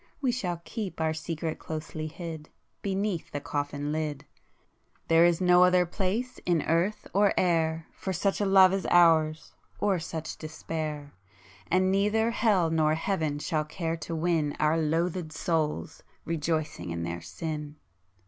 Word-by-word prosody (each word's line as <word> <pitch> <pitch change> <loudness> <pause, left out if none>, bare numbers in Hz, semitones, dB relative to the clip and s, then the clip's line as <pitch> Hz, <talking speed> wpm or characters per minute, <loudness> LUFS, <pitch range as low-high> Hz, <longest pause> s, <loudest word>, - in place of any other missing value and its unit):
—we 265 -4 +1
shall 180 -8 -2
keep 210 -7 -5
Our 160 -1 +1
secret 160 0 -4
closely 155 0 -5
hid 160 -1 -7 0.3
Beneath 195 -3 -2
the 145 - -4
coffin 145 0 -3
lid,— 155 -2 -3 0.8
There 165 +1 +6
is 175 -1 +3
no 180 -1 +6
other 180 0 +5
place 210 +8 -2
in 170 -4 +1
earth 170 +6 0
or 200 0 +3
air 165 -2 +1
For 190 - -4
such 195 +3 0
a - - +2
love 190 -1 +7
as 195 -1 -1
ours, 160 -3 +4 0.2
or 195 -3 +1
such 160 -1 -6
despair! 155 -2 -5 0.6
[p - - +2
157] - - +5
And 185 0 +3
neither 210 +4 +2
hell 200 -8 +2
nor 155 -1 +3
heaven 160 -4 -1
shall 155 +1 -1
care 165 +1 -3
to 165 +1 -5
win 160 -3 0
Our 155 +1 +3
loathëd 165 +1 0
souls, 150 - -1 0.2
rejoicing 155 - -2
in 85 0 -3
their 85 0 -4
sin! 150 - -5
165 Hz, 155 wpm, -28 LUFS, 155-185 Hz, 0.8 s, love